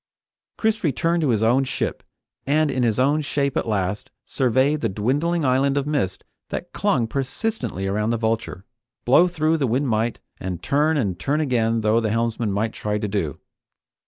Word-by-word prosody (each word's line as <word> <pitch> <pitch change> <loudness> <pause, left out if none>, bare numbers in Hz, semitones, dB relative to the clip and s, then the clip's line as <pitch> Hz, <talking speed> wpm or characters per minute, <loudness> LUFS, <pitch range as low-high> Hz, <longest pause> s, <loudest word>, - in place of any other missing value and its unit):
Chris 220 0 0
returned 165 +3 +1
to 150 - +1
his 110 -2 +2
own 125 +4 +4
ship, 130 - -3 0.5
and 150 +1 +2
in 130 - -1
his 115 -3 +1
own 145 +4 +2
shape 140 -1 -1
at - - -1
last, 105 +4 -1 0.2
surveyed 135 +4 +1
the - - 0
dwindling 145 - 0
island 135 +2 +2
of 140 - 0
mist 130 -11 -1 0.3
that 175 - -5
clung 200 - +1
persistently 135 - -3
around 105 +3 0
the 115 - +1
Vulture, 110 -4 -2 0.4
blow 145 +8 +6
though 160 -2 +1
the 140 -4 0
wind 130 +5 0
might, 115 0 0 0.2
and 90 -2 -5
turn 150 +3 +2
and 95 - -1
turn 140 - 0
again 115 -6 +1
though 110 +1 +3
the 110 -2 -1
helmsman 115 -1 0
might 105 +3 -1
try 105 0 -2
to 105 - -2
do. 95 -9 -2
125 Hz, 180 wpm, -23 LUFS, 110-145 Hz, 0.5 s, blow